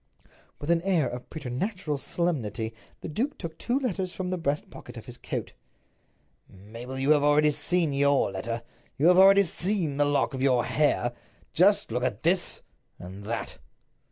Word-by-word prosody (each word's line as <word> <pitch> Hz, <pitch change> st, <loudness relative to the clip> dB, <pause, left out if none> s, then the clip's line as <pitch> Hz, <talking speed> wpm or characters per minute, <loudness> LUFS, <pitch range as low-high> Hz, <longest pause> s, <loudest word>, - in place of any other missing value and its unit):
With 145 Hz, +3 st, -1 dB
an 170 Hz, -1 st, +3 dB
air 175 Hz, -7 st, +1 dB
of 125 Hz, +1 st, -7 dB
preternatural 155 Hz, -, -3 dB
solemnity 120 Hz, -, -2 dB, 0.3 s
the -, -, -5 dB
duke 250 Hz, -, -2 dB
took 165 Hz, -1 st, -6 dB
two 245 Hz, +2 st, 0 dB
letters 190 Hz, -9 st, -2 dB
from 185 Hz, 0 st, -4 dB
the 185 Hz, -, -1 dB
breast 145 Hz, -2 st, -2 dB
pocket -, -, -11 dB
of -, -, -9 dB
his -, -, -8 dB
coat. -, -, -5 dB, 1.0 s
"Mabel, 115 Hz, +7 st, -9 dB
you 135 Hz, +3 st, +2 dB
have 150 Hz, -1 st, +5 dB
already 150 Hz, +1 st, +4 dB
seen 165 Hz, 0 st, +1 dB
your 140 Hz, -5 st, +3 dB
letter. 115 Hz, +5 st, -4 dB, 0.3 s
You 155 Hz, +6 st, +5 dB
have 180 Hz, 0 st, +6 dB
already 195 Hz, +1 st, +8 dB
seen 175 Hz, -4 st, -1 dB
the 145 Hz, -, +3 dB
lock 145 Hz, 0 st, +1 dB
of 130 Hz, -, -4 dB
your 125 Hz, -3 st, +3 dB
hair. 120 Hz, -5 st, +1 dB, 0.4 s
Just 200 Hz, -, +4 dB
look 125 Hz, +2 st, -1 dB
at 120 Hz, -4 st, -2 dB
this—and 100 Hz, -, -3 dB
that." 115 Hz, +2 st, -4 dB
145 Hz, 165 wpm, -27 LUFS, 125-180 Hz, 1.0 s, already